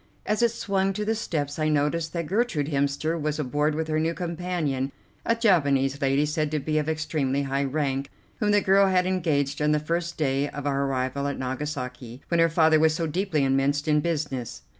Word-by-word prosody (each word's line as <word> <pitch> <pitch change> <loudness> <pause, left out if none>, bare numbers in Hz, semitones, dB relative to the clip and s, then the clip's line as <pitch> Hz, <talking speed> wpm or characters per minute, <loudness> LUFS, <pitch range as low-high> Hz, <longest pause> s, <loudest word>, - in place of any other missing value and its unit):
As 210 +2 0
it 235 - +5
swung 195 -3 -1
to 210 +2 -3
the 220 - +1
steps 150 -9 -3
I 155 0 +1
noticed 155 +2 0
that 170 -2 -2
Gertrude 180 - 0
Hemster 145 +3 0
was 150 0 -1
aboard 150 +1 0
with 160 0 -2
her 155 0 0
new 165 +1 0
companion, 170 -6 -2 0.4
a 230 - +3
Japanese 140 - +2
lady, 135 +2 +2
said 150 0 -1
to 155 0 -1
be 155 +2 0
of 150 +1 -2
extremely 150 -3 -1
high 135 +1 -1
rank, 135 -1 -1 0.3
whom 210 - +1
the 205 0 +4
girl 195 +1 +4
had 185 -1 +2
engaged 150 -6 0
on 150 0 +3
the 150 - +2
first 170 +3 -2
day 140 -1 0
of 145 0 -7
our 140 -1 0
arrival 135 +1 -1
at 140 - -3
Nagasaki, 130 -2 -5
when 170 - +2
her 165 0 +5
father 160 -1 +4
was 160 0 +3
so 165 0 -1
deeply 165 -1 0
immersed 135 +2 +1
in 150 -1 +4
business. 140 -7 -3
150 Hz, 205 wpm, -25 LUFS, 140-170 Hz, 0.4 s, it